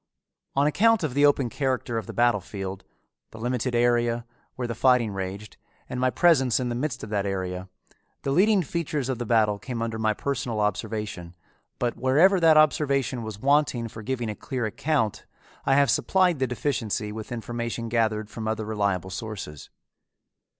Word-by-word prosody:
On 140 +1 +3
account 220 +7 +3
of 150 -5 -1
the 145 +2 +5
open 140 -3 +2
character 125 -3 -1
of 110 - -9
the - - -5
battle 120 -4 +3
field, 95 0 -6 0.5
the - - -12
limited 125 +1 -1
area, 120 -1 +2 0.3
where 125 -1 -3
the 115 - -3
fighting 125 -2 +3
raged, 95 +1 -6 0.3
and 125 - -4
my 130 0 +3
presence 135 -6 +3
in 125 -1 -1
the - - -2
midst 125 +1 -3
of 105 - -7
that 100 -1 0
area, 95 -1 -3 0.5
the 135 - -1
leading 195 +5 +4
features 150 -4 -2
of 130 -3 -2
the 120 - -4
battle 105 -3 +3
came 125 0 -5
under 115 -1 -3
my 110 -1 +1
personal 120 -5 -2
observation, 105 -4 -3 0.4
but 120 -1 -1
wherever 155 +10 +4
that 160 -2 +6
observation 140 -5 +2
was 110 -2 -6
wanting 140 -3 +2
for 110 0 -9
giving 120 -1 -2
a - - -7
clear 130 -1 -3
account 135 -1 -1 0.4
I 135 - +5
have 140 -3 +4
supplied 180 0 +2
the 130 - +1
deficiency 115 -4 -2
with 110 +3 -7
information 120 0 -4
gathered 110 -2 0
from 110 +1 -6
other 110 0 -2
reliable 100 -4 -1
sources. 95 -8 -7
120 Hz, 175 wpm, -26 LUFS, 110-135 Hz, 0.5 s, that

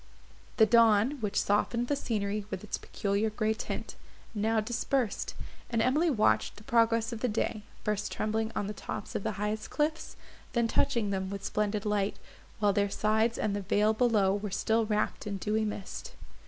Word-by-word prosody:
The 220 - +7
dawn, 230 +4 +4
which 210 -2 0
softened 235 +4 +1
the 285 - +1
scenery 210 -6 -2
with 190 -1 -5
its 210 - -4
peculiar 200 +2 -1
grey 215 +1 0
tint, 220 - -5 0.4
now 220 +1 +1
dispersed, 240 +1 -1 0.3
and 230 - 0
Emily 290 +9 +3
watched 220 -7 +2
the 210 - -13
progress 230 0 +2
of 230 - -5
the 250 - 0
day, 215 -1 -1 0.2
first 210 -1 -1
trembling 220 +1 -1
on - - -1
the 210 - -4
tops 200 - -6
of - - -2
the 215 - -2
highest 210 +2 -3
cliffs, 310 +1 -1 0.4
then 235 -2 +2
touching 225 -2 +1
them 190 -1 -2
with 200 0 -5
splendid 210 0 -1
light, 210 -1 0 0.4
while 205 -2 +3
their 200 0 +2
sides 220 +3 +1
and 205 -2 0
the 205 - -2
vale 210 +3 +2
below 215 -5 +3
were 205 +1 -2
still 220 +3 +1
wrapt 210 0 -1
in 200 -1 -2
dewy 215 +3 0
mist. 210 -2 -6
215 Hz, 180 wpm, -30 LUFS, 205-230 Hz, 0.4 s, The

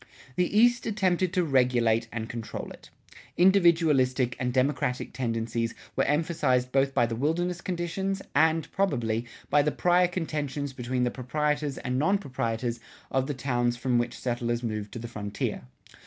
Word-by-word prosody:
The 180 +5 +1
East 240 +1 +4
attempted 185 -4 +1
to 180 - +2
regulate 125 -5 +2
and 110 -1 -4
control 115 -2 -6
it. - - -13 0.5
Individualistic 160 -9 +4
and 125 0 0
democratic 130 -1 0
tendencies 115 -1 -2 0.2
were - - +2
emphasized 145 -5 +1
both 135 0 +2
by 120 -3 +4
the 115 0 -3
wilderness 170 +7 -1
conditions 185 +2 -2
and, 160 +1 +2
probably, 120 - 0 0.2
by 145 - +5
the 150 +1 +1
prior 180 +2 +3
contentions 150 -5 -3
between 125 0 -2
the 125 - +1
proprietors 150 +2 -1
and 125 +1 -2
non 190 +8 +3
proprietors 120 - -3 0.3
of 135 0 +1
the 145 - -3
towns 120 -2 0
from 125 -1 +1
which 120 0 -2
settlers 120 -1 -2
moved 110 -3 -3
to - - -5
the 120 0 -6
frontier. 105 - -4
130 Hz, 155 wpm, -27 LUFS, 120-165 Hz, 0.5 s, by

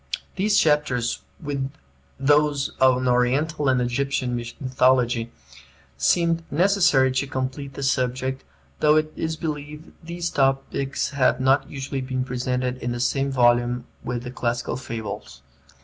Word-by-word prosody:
These 205 +2 +2
chapters, 145 -7 +2 0.2
with 140 -3 -3 0.5
those 145 0 +2
on 130 -1 +4
Oriental 135 +5 +1
and 130 -1 +3
Egyptian 125 0 -1
mythology, 120 -1 +1 0.6
seemed 170 -1 +2
necessary 175 -6 +3
to 130 +2 -1
complete 135 0 -4
the 140 - -5
subject, 130 0 -1 0.4
though 150 0 +5
it 155 0 +1
is 160 0 -2
believed 150 0 -6
these 170 +1 -4
topics 135 0 0
have 135 -3 +2
not 135 +1 +2
usually 135 -1 -4
been 130 0 -2
presented 125 0 -2
in 120 -1 -3
the 120 - -4
same 135 +3 0
volume 120 -1 +2 0.2
with 120 -1 -3
the 125 - -6
classical 120 -1 -2
fables. 110 -5 -7
135 Hz, 130 wpm, -24 LUFS, 125-145 Hz, 0.6 s, though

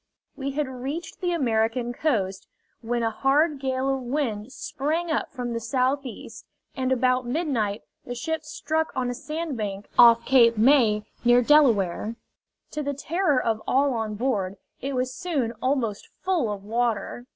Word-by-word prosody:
We 275 -1 -4
had 295 0 -1
reached 270 +9 -6
the 355 -1 0
American 240 -5 0
coast, 200 -10 -1 0.3
when 235 0 -1
a 225 - +1
hard 285 +5 +2
gale 265 0 -1
of 270 -1 0
wind 245 -4 -2
sprang 315 +6 -2
up 315 - -1
from 245 -3 -4
the 230 - -2
southeast, 255 +2 -2 0.3
and 260 -2 -1
about 255 0 +2
midnight 240 -8 -1 0.2
the 245 - -6
ship 320 +6 -3
struck 315 +1 -2
on 250 -1 -1
a - - -3
sandbank 245 -9 -4
off 235 -1 +8
Cape 235 -4 +5
May, 220 -3 +4 0.2
near 240 +1 +5
Delaware. 230 - +3 0.6
To 300 - -3
the 285 -1 -2
terror 300 0 +1
of 220 -2 -1
all 275 +1 +3
on 220 -2 -2
board, 205 -5 -1 0.3
it 275 +1 -3
was 255 0 -1
soon 290 -9 -1
almost 255 -6 -1
full 345 - +1
of 200 -1 -6
water. 235 +2 -2
255 Hz, 155 wpm, -25 LUFS, 230-285 Hz, 0.6 s, off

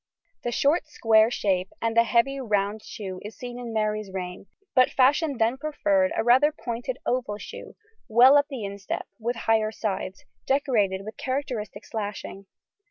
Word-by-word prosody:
The 240 - -2
short 290 +7 +2
square 225 -6 +4
shape 190 -6 0
and 230 0 -1
the 230 0 +5
heavy 250 +4 +2
round 210 -3 0
shoe 190 -4 -7
is 210 +2 -9
seen 245 -1 -7
in 240 -2 -6
Mary's 215 -2 -1
reign, 180 0 -6 0.3
but 255 -1 +5
fashion 280 +2 +3
then 230 +3 +2
preferred 295 -1 +1
a - - +2
rather 260 +6 +5
pointed 245 -2 -5
oval 240 -5 -1
shoe, - - -10 0.3
well 250 +4 +7
up 285 0 +4
the 255 -7 -5
instep 200 -1 -5
with 235 +2 -2
higher 225 -1 +1
sides, 195 -3 -4 0.2
decorated 225 -9 +1
with 215 - -8
characteristic 250 -7 -4
slashing. 205 -2 -6
230 Hz, 160 wpm, -26 LUFS, 210-260 Hz, 0.3 s, well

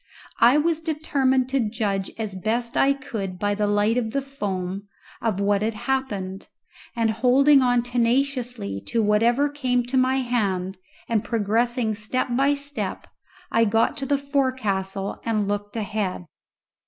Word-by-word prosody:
I 245 +5 +6
was 325 +1 +1
determined 275 -5 +1
to 270 0 +1
judge 210 -4 -1
as 215 -3 -4
best 230 +5 -2
I 275 +1 +4
could 220 -10 -5
by 205 +2 0
the 210 0 0
light 205 +3 +2
of 225 -2 -4
the 275 - +1
foam 200 -7 -4 0.3
of 215 -4 -1
what 200 0 +2
had 220 +1 -1
happened, 210 -6 -3 0.5
and 230 -2 +1
holding 265 +5 +5
on 245 -1 +3
tenaciously 245 - -1
to 230 -1 +1
whatever 230 +7 +3
came 255 -4 0
to 250 +2 -2
my 255 +1 +3
hand 195 -7 -1 0.3
and 225 -3 +1
progressing 230 +1 0
step 220 +5 -1
by 275 +3 +3
step 285 +1 -4 0.5
I 230 0 +4
got 225 +5 +2
to 275 -2 -3
the 285 - +2
forecastle 215 -9 -1
and 215 -3 0
looked 205 +1 -3
ahead. 205 -4 -2
230 Hz, 150 wpm, -24 LUFS, 205-265 Hz, 0.5 s, I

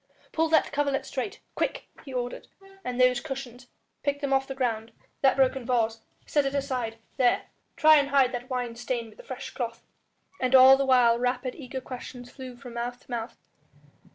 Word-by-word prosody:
"Pull 325 0 +1
that 315 - +3
coverlet 280 -1 0
straight, 280 +9 -4
quick!" - - -1 0.2
he 270 - -8
ordered, 245 -1 -4 0.4
"and 250 -3 -4
those 250 -1 +5
cushions, 255 -4 -7 0.3
pick 285 0 -1
them 280 -2 -1
off 270 0 +2
the 270 - -5
ground... 230 -4 -1 0.3
that 270 - +5
broken 265 -1 +2
vase, 230 -2 +1 0.3
set 290 - +2
it 275 +1 -2
aside.... 255 -5 -2 0.2
There! 245 -2 +3 0.3
try 310 -1 +7
and 280 -1 +2
hide 270 -2 +4
that 245 +1 -5
wine 245 -2 -2
stain 235 -1 -3
with - - -21
a - - -10
fresh 260 0 -7
cloth." 235 -2 -5 0.6
And 255 0 +3
all 260 +1 +10
the 275 0 0
while 240 -3 +5
rapid, 250 +1 -1
eager 260 -3 -6
questions 245 -1 -8
flew 260 -2 -9
from 245 -1 -11
mouth 240 +1 -4
to - - -17
mouth. 235 0 -4
255 Hz, 185 wpm, -27 LUFS, 245-270 Hz, 0.6 s, all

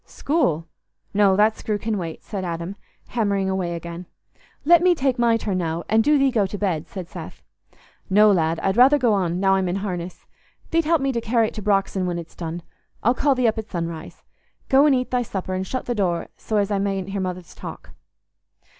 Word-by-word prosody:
"School? 175 - -1 0.5
No, 200 -2 +4
that 215 +2 +4
screw 210 -1 -2
can 215 +1 -2
wait," 170 -5 -5
said 195 -2 -5
Adam, 170 +2 -4 0.3
hammering 200 -4 0
away 180 -3 -2
again. 170 +1 -7 0.6
"Let 340 +2 +7
me 360 0 +4
take 265 -4 0
my 235 -1 +4
turn 200 -4 -2
now, 165 0 -2
and 220 +1 +3
do 295 +4 +4
thee 275 -1 +3
go 210 -5 +2
to 205 - -6
bed," 180 -6 -1
said 185 -3 -7
Seth. - - -10 0.7
"No, 210 +2 +6
lad, 165 -3 +1
I'd 195 +3 0
rather 265 +4 +7
go 240 -6 +2
on, 180 -3 0
now 195 0 +3
I'm 190 -2 +1
in 175 - -1
harness. 180 -2 -5 0.5
Thee't 330 -1 +2
help 325 -1 +2
me 275 0 +1
to 235 -2 -2
carry 225 -1 +2
it - - -16
to 215 - -6
Brox'on 195 -2 +1
when 175 -1 -2
it's 170 -1 -8
done. 170 0 -5 0.4
I'll 240 - +4
call 275 +1 +2
thee 250 -2 +2
up 220 0 0
at 220 - -7
sunrise. 165 -2 -5 0.5
Go 275 +3 +6
and 280 - +4
eat 255 0 -2
thy 250 -1 +2
supper, 190 -5 -4
and 185 0 -2
shut 255 - -3
the 245 - -1
door 180 -6 -1
so 215 - -3
as 205 0 +1
I 200 - +1
mayn't 195 -1 -2
hear 195 0 -2
Mother's 180 -2 -5
talk." - - -9
200 Hz, 215 wpm, -23 LUFS, 180-235 Hz, 0.7 s, Let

